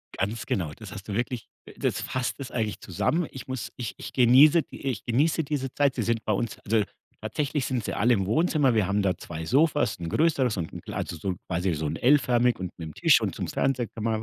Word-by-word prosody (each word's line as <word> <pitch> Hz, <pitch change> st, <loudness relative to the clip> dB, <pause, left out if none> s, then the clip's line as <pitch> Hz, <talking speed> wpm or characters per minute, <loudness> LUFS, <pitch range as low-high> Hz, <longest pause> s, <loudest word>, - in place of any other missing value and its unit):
Ganz 105 Hz, +4 st, -2 dB
genau, 85 Hz, -6 st, -1 dB
das 105 Hz, +3 st, -11 dB
hast 100 Hz, -2 st, -9 dB
du 105 Hz, -, -4 dB
wirklich 120 Hz, +2 st, -2 dB, 0.2 s
äh, -, -, -12 dB
das -, -, -1 dB
fasst 125 Hz, -1 st, -2 dB
es 135 Hz, -2 st, -6 dB
eigentlich 110 Hz, -6 st, -2 dB
zusammen. 155 Hz, -, -1 dB
Ich 130 Hz, 0 st, -9 dB
muss 130 Hz, -3 st, -4 dB
ich 120 Hz, -5 st, -5 dB
ich -, -, -8 dB
genieße 135 Hz, +6 st, +6 dB
die, -, -, -12 dB
äh -, -, +1 dB
ich 120 Hz, -6 st, -3 dB
genieße 150 Hz, +7 st, +2 dB
diese 140 Hz, -3 st, -3 dB
Zeit. 140 Hz, -2 st, +2 dB
Sie 120 Hz, -, -1 dB
sind 115 Hz, 0 st, 0 dB
bei -, -, +1 dB
uns 110 Hz, +1 st, -1 dB
also, 110 Hz, 0 st, +1 dB, 0.4 s
tatsächlich 145 Hz, -2 st, -1 dB
sind 125 Hz, -3 st, -1 dB
sie -, -, -3 dB
alle 120 Hz, +4 st, +3 dB
im 95 Hz, -4 st, +1 dB
Wohnzimmer. 145 Hz, -, +2 dB
Wir 105 Hz, -5 st, +2 dB
haben 100 Hz, +1 st, +1 dB
da 95 Hz, -2 st, +1 dB
2 80 Hz, -1 st, -7 dB
Sofas, 145 Hz, -, +2 dB
'n 85 Hz, -, -4 dB
größeres 135 Hz, -, +2 dB
und 85 Hz, -3 st, -3 dB
'n -, -, -8 dB
kle -, -, -8 dB
also, 85 Hz, -, -3 dB
so 90 Hz, +5 st, -4 dB
'n 90 Hz, -, -2 dB
quasi 90 Hz, +1 st, 0 dB
so 80 Hz, 0 st, -3 dB
'n 75 Hz, -, -2 dB
L-förmig 125 Hz, -3 st, +3 dB
und 90 Hz, -1 st, -4 dB
mit -, -, -27 dB
'nem 80 Hz, -2 st, -6 dB
Tisch -, -, +5 dB
und -, -, -2 dB
zum -, -, -3 dB
Fernseher 130 Hz, -3 st, 0 dB
kann 110 Hz, -, -8 dB
man 110 Hz, -1 st, 0 dB
115 Hz, 255 wpm, -26 LUFS, 100-135 Hz, 0.4 s, genieße